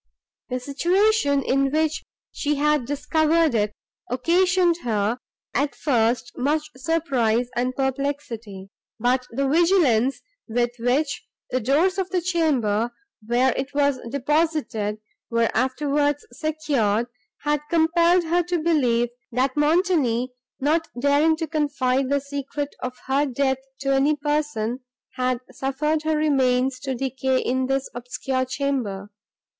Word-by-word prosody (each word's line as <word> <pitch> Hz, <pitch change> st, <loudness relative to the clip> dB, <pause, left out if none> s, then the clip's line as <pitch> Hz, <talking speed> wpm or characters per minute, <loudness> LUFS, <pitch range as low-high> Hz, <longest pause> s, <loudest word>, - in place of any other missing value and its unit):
The 255 Hz, 0 st, -2 dB
situation, 290 Hz, -, +2 dB
in 275 Hz, +1 st, +2 dB
which 315 Hz, +2 st, 0 dB, 0.3 s
she 295 Hz, 0 st, -1 dB
had 295 Hz, -2 st, +2 dB
discovered 315 Hz, +3 st, +2 dB
it, 210 Hz, -2 st, +1 dB, 0.4 s
occasioned 350 Hz, +6 st, +2 dB
her, 225 Hz, -5 st, -1 dB, 0.3 s
at 280 Hz, +2 st, 0 dB
first, 240 Hz, -3 st, +1 dB
much 300 Hz, +4 st, -1 dB
surprise 260 Hz, -6 st, 0 dB
and 250 Hz, +1 st, -1 dB
perplexity; 260 Hz, -8 st, -3 dB, 0.3 s
but 250 Hz, +2 st, +1 dB
the 275 Hz, +3 st, -1 dB
vigilance, 275 Hz, -, +3 dB, 0.3 s
with 240 Hz, +1 st, 0 dB
which 270 Hz, +5 st, 0 dB, 0.2 s
the 255 Hz, -, +1 dB
doors 315 Hz, -, +2 dB
of 375 Hz, -1 st, -1 dB
the 370 Hz, -1 st, +1 dB
chamber, 275 Hz, -, +1 dB, 0.3 s
where 240 Hz, +3 st, +2 dB
it 275 Hz, +2 st, -4 dB
was 285 Hz, -2 st, +2 dB
deposited, 280 Hz, -6 st, 0 dB, 0.3 s
were 230 Hz, -1 st, +1 dB
afterwards 285 Hz, +3 st, 0 dB
secured, 260 Hz, -7 st, 0 dB, 0.4 s
had 295 Hz, 0 st, +1 dB
compelled 340 Hz, +2 st, +3 dB
her 340 Hz, +2 st, +2 dB
to 350 Hz, +1 st, -1 dB
believe, 255 Hz, -8 st, +2 dB, 0.2 s
that 255 Hz, +2 st, 0 dB
Montoni, 295 Hz, -6 st, +2 dB, 0.3 s
not 320 Hz, +4 st, +1 dB
daring 285 Hz, +4 st, +3 dB
to 325 Hz, -1 st, -3 dB
confide 275 Hz, -4 st, 0 dB
the 280 Hz, 0 st, +1 dB
secret 285 Hz, +1 st, -5 dB
of 255 Hz, 0 st, -4 dB
her 275 Hz, +2 st, +1 dB
death 265 Hz, 0 st, 0 dB, 0.2 s
to 275 Hz, 0 st, +1 dB
any 280 Hz, +3 st, +3 dB
person, 290 Hz, -6 st, -1 dB, 0.3 s
had 255 Hz, -1 st, -1 dB
suffered 300 Hz, +4 st, -1 dB
her 315 Hz, 0 st, 0 dB
remains 265 Hz, -3 st, +2 dB
to 265 Hz, -1 st, -3 dB
decay 265 Hz, +1 st, 0 dB
in 260 Hz, +1 st, 0 dB
this 270 Hz, 0 st, 0 dB
obscure 260 Hz, +2 st, -2 dB
chamber. 255 Hz, -7 st, -3 dB
275 Hz, 125 wpm, -23 LUFS, 250-310 Hz, 0.4 s, vigilance